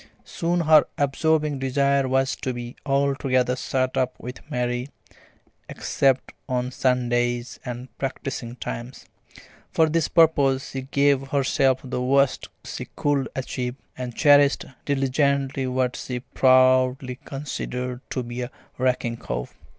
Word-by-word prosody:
Soon 175 Hz, +1 st, -1 dB
her 155 Hz, -2 st, +6 dB
absorbing 150 Hz, +1 st, +1 dB
desire 140 Hz, +1 st, +2 dB
was 130 Hz, 0 st, +1 dB
to 130 Hz, -, -3 dB
be 120 Hz, 0 st, -7 dB
altogether 135 Hz, -2 st, +1 dB
shut 130 Hz, 0 st, -1 dB
up 130 Hz, -1 st, -1 dB
with 125 Hz, +2 st, -7 dB
Mary, 125 Hz, +1 st, -2 dB, 0.8 s
except 135 Hz, -2 st, 0 dB, 0.2 s
on 125 Hz, 0 st, -1 dB
Sundays 120 Hz, -1 st, 0 dB
and 125 Hz, -1 st, -5 dB
at 130 Hz, -, -17 dB
practising 130 Hz, -3 st, -4 dB
times. 120 Hz, +1 st, -7 dB, 0.6 s
For 160 Hz, -, +3 dB
this 160 Hz, 0 st, +1 dB
purpose 140 Hz, -5 st, +3 dB
she 135 Hz, -, -4 dB
gave 140 Hz, 0 st, +2 dB
herself 135 Hz, -1 st, +2 dB
the 125 Hz, -1 st, -3 dB
worst 140 Hz, +1 st, +2 dB
cold -, -, -44 dB, 0.2 s
she -, -, -5 dB
could 140 Hz, -2 st, 0 dB
achieve, 125 Hz, -1 st, -3 dB, 0.2 s
and 125 Hz, -2 st, -6 dB
cherished 145 Hz, -2 st, +5 dB, 0.2 s
diligently 140 Hz, -1 st, +1 dB
what 130 Hz, 0 st, 0 dB
she 125 Hz, -1 st, -5 dB
proudly 130 Hz, 0 st, +3 dB
considered 125 Hz, -3 st, -4 dB
to 130 Hz, -, -2 dB
be 120 Hz, +1 st, -5 dB
a 125 Hz, -, -4 dB, 0.3 s
racking 125 Hz, -2 st, 0 dB
cough. -, -, -5 dB
130 Hz, 130 wpm, -24 LUFS, 125-140 Hz, 0.8 s, her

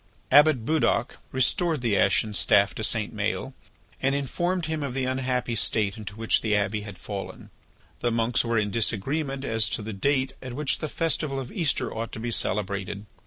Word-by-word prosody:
Abbot 145 Hz, -4 st, +6 dB
Budoc 135 Hz, -5 st, +1 dB
restored 150 Hz, +4 st, +1 dB
the 115 Hz, -4 st, +1 dB
ashen 105 Hz, +2 st, +2 dB
staff 100 Hz, -1 st, +4 dB
to 110 Hz, -, -5 dB
St. 110 Hz, 0 st, 0 dB
Maël 105 Hz, +6 st, -2 dB, 0.5 s
and 135 Hz, +1 st, +2 dB
informed 175 Hz, +6 st, -1 dB
him 160 Hz, -1 st, -2 dB
of 140 Hz, -3 st, -3 dB
the 130 Hz, -1 st, 0 dB
unhappy 130 Hz, -2 st, -1 dB
state 105 Hz, -2 st, +1 dB
into 105 Hz, -2 st, -8 dB
which 115 Hz, 0 st, +2 dB
the 105 Hz, -1 st, +1 dB
Abbey 105 Hz, +1 st, 0 dB
had 105 Hz, -2 st, -9 dB
fallen. 100 Hz, 0 st, -7 dB, 0.5 s
The 120 Hz, -, +1 dB
monks 115 Hz, +1 st, +2 dB
were 115 Hz, -1 st, 0 dB
in 105 Hz, -1 st, +1 dB
disagreement 135 Hz, +6 st, -1 dB
as 115 Hz, -2 st, +2 dB
to 110 Hz, -, -3 dB
the 110 Hz, +1 st, -5 dB
date 130 Hz, +5 st, +1 dB
on 130 Hz, -2 st, -6 dB
which 150 Hz, -1 st, 0 dB
the 155 Hz, -, -3 dB
festival 155 Hz, -4 st, -1 dB
of 130 Hz, -2 st, -6 dB
Easter 165 Hz, -6 st, 0 dB
ought 115 Hz, 0 st, -4 dB
to -, -, -5 dB
be 120 Hz, +1 st, -3 dB
celebrated. 100 Hz, -1 st, -2 dB
120 Hz, 185 wpm, -26 LUFS, 105-135 Hz, 0.5 s, Abbot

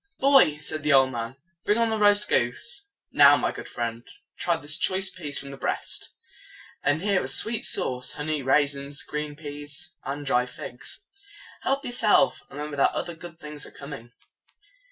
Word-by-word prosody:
"Boy," 270 Hz, -, +5 dB
said 155 Hz, 0 st, -3 dB
the 150 Hz, 0 st, +2 dB
old 135 Hz, -1 st, +5 dB
man, 115 Hz, 0 st, -5 dB, 0.3 s
"bring 210 Hz, -, +2 dB
on 230 Hz, -1 st, +2 dB
the 220 Hz, -, 0 dB
roast 205 Hz, 0 st, +4 dB
goose. 235 Hz, -, +1 dB, 0.2 s
Now, -, -, +8 dB
my -, -, 0 dB
good -, -, -8 dB
friend, 115 Hz, 0 st, -4 dB, 0.3 s
try 170 Hz, -2 st, 0 dB
this 150 Hz, -1 st, -1 dB
choice 190 Hz, +1 st, +1 dB
piece 150 Hz, -6 st, -5 dB
from 140 Hz, -, -5 dB
the 135 Hz, -, -9 dB
breast. -, -, -3 dB, 0.7 s
And 145 Hz, +4 st, +1 dB
here 200 Hz, -2 st, +2 dB
are -, -, -4 dB
sweet 225 Hz, 0 st, +1 dB
sauce, 125 Hz, 0 st, +1 dB
honey, 150 Hz, 0 st, -2 dB
raisins, 140 Hz, +1 st, 0 dB
green 150 Hz, 0 st, -5 dB
peas, 145 Hz, -1 st, -5 dB
and 145 Hz, +2 st, -5 dB
dry 125 Hz, -2 st, +2 dB
figs. 125 Hz, -, -7 dB, 0.6 s
Help 275 Hz, +2 st, -1 dB
yourself, 210 Hz, -6 st, +3 dB
and 140 Hz, -, -11 dB
remember 150 Hz, 0 st, -5 dB
that 140 Hz, -, +3 dB
other 175 Hz, -, -3 dB
good 165 Hz, 0 st, -11 dB
things 150 Hz, -1 st, -8 dB
are -, -, -13 dB
coming." 135 Hz, -5 st, -10 dB
150 Hz, 175 wpm, -26 LUFS, 135-185 Hz, 0.7 s, Now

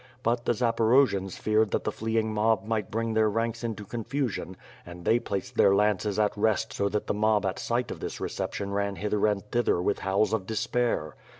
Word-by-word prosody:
But 120 Hz, +1 st, 0 dB
the 120 Hz, -, +2 dB
Za 120 Hz, 0 st, +1 dB
porojians 110 Hz, -5 st, +3 dB
feared 110 Hz, 0 st, +2 dB
that -, -, -1 dB
the -, -, -1 dB
fleeing 110 Hz, 0 st, -1 dB
mob 110 Hz, -1 st, +2 dB
might 110 Hz, -1 st, -2 dB
bring 115 Hz, +1 st, -1 dB
their 110 Hz, -1 st, +3 dB
ranks 115 Hz, +2 st, -2 dB
into 110 Hz, -3 st, -4 dB
confusion 115 Hz, -4 st, -3 dB, 0.3 s
and 85 Hz, 0 st, -11 dB
they 115 Hz, -, +4 dB
placed 100 Hz, -5 st, -5 dB
their 100 Hz, -, +5 dB
lances 105 Hz, 0 st, +1 dB
at 105 Hz, -1 st, +2 dB
rest 105 Hz, -1 st, +1 dB
so 100 Hz, -, 0 dB
that 105 Hz, +1 st, -2 dB
the -, -, -1 dB
mob 105 Hz, -1 st, +2 dB
at 95 Hz, 0 st, -2 dB
sight 120 Hz, 0 st, -1 dB
of -, -, -6 dB
this -, -, -5 dB
reception 100 Hz, 0 st, -3 dB
ran 100 Hz, 0 st, -1 dB
hither 105 Hz, +1 st, 0 dB
and 105 Hz, -1 st, -1 dB
thither 120 Hz, -7 st, +2 dB
with 95 Hz, +3 st, 0 dB
howls 95 Hz, +2 st, +1 dB
of 100 Hz, -4 st, -1 dB
despair. 110 Hz, -, -1 dB
110 Hz, 205 wpm, -27 LUFS, 100-115 Hz, 0.3 s, their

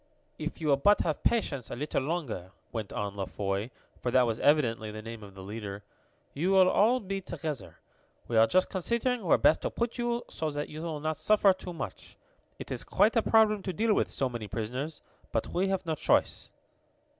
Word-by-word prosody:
"If 155 Hz, +1 st, -4 dB
you 155 Hz, -2 st, -1 dB
will 140 Hz, -, +5 dB
but 205 Hz, +9 st, +4 dB
have 155 Hz, -3 st, -1 dB
patience 145 Hz, -, 0 dB
a -, -, -4 dB
little 145 Hz, +3 st, -1 dB
longer," 135 Hz, -, -3 dB, 0.2 s
went 110 Hz, -4 st, -4 dB
on 100 Hz, -1 st, -3 dB
La 100 Hz, -1 st, -3 dB
Foy, 100 Hz, +3 st, -2 dB, 0.3 s
for 125 Hz, -, -1 dB
that 125 Hz, +1 st, +5 dB
was 115 Hz, -1 st, -1 dB
evidently 120 Hz, -7 st, +2 dB
the 110 Hz, 0 st, -7 dB
name 115 Hz, 0 st, -7 dB
of 100 Hz, -2 st, -12 dB
the 95 Hz, -, -9 dB
leader, 100 Hz, 0 st, -6 dB, 0.5 s
"you 165 Hz, +6 st, 0 dB
will 190 Hz, -1 st, +6 dB
all 225 Hz, +7 st, +4 dB
be 195 Hz, -2 st, -4 dB
together. 160 Hz, -6 st, -5 dB, 0.5 s
We 120 Hz, -, -2 dB
are 110 Hz, 0 st, +6 dB
just 185 Hz, +6 st, +3 dB
considering 235 Hz, +5 st, -1 dB
where 175 Hz, -, +4 dB
best -, -, +4 dB
to -, -, -1 dB
put 235 Hz, +1 st, -3 dB
you 240 Hz, 0 st, 0 dB
so 160 Hz, -, -3 dB
that 145 Hz, 0 st, -4 dB
you 155 Hz, +1 st, -7 dB
will 160 Hz, -3 st, -4 dB
not 155 Hz, 0 st, -1 dB
suffer 210 Hz, -2 st, +4 dB
too 180 Hz, -1 st, -8 dB
much. 165 Hz, -, -7 dB, 0.4 s
It -, -, -8 dB
is -, -, -3 dB
quite 220 Hz, -, +3 dB
a 230 Hz, -, +5 dB
problem 215 Hz, -2 st, +4 dB
to 190 Hz, -1 st, -4 dB
deal 220 Hz, +4 st, +2 dB
with -, -, +1 dB
so 135 Hz, -, 0 dB
many 120 Hz, -4 st, -5 dB
prisoners, 125 Hz, +9 st, -4 dB, 0.3 s
but -, -, -1 dB
we 185 Hz, +2 st, 0 dB
have 190 Hz, -1 st, -1 dB
no 160 Hz, -, 0 dB
choice." 155 Hz, -, +1 dB
155 Hz, 210 wpm, -29 LUFS, 115-195 Hz, 0.5 s, will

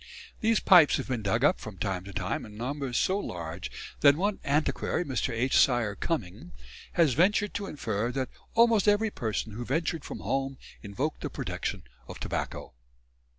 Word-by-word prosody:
These 225 Hz, -1 st, +3 dB
pipes 175 Hz, -6 st, +7 dB
have -, -, -4 dB
been 125 Hz, -4 st, -2 dB
dug 110 Hz, +4 st, 0 dB
up 150 Hz, -, +4 dB
from 105 Hz, -3 st, -9 dB
time 90 Hz, 0 st, -2 dB
to 100 Hz, -, -8 dB
time 95 Hz, 0 st, -2 dB
in 105 Hz, -2 st, -11 dB
numbers 130 Hz, +1 st, -3 dB
so 190 Hz, +2 st, +2 dB
large 85 Hz, -, -5 dB, 0.3 s
that 140 Hz, -1 st, +7 dB
one 195 Hz, +5 st, -1 dB
antiquary, 150 Hz, +4 st, 0 dB
Mr. 130 Hz, -4 st, -1 dB
H. 125 Hz, +4 st, 0 dB
Syer 120 Hz, -5 st, +4 dB
Cuming, 100 Hz, -, -4 dB, 0.4 s
has 165 Hz, -7 st, +4 dB
ventured 205 Hz, -, +2 dB
to 200 Hz, -1 st, -3 dB
infer 115 Hz, -, -2 dB
that 130 Hz, -1 st, -2 dB, 0.3 s
"almost 230 Hz, -3 st, +5 dB
every 210 Hz, +1 st, +3 dB
person 110 Hz, -, -3 dB
who 115 Hz, +4 st, -5 dB
ventured 160 Hz, +4 st, -1 dB
from -, -, -7 dB
home 135 Hz, 0 st, -1 dB, 0.2 s
invoked 125 Hz, +9 st, -3 dB
the -, -, -3 dB
protection -, -, -4 dB, 0.2 s
of -, -, -9 dB
tobacco." -, -, -4 dB
135 Hz, 170 wpm, -28 LUFS, 110-175 Hz, 0.4 s, pipes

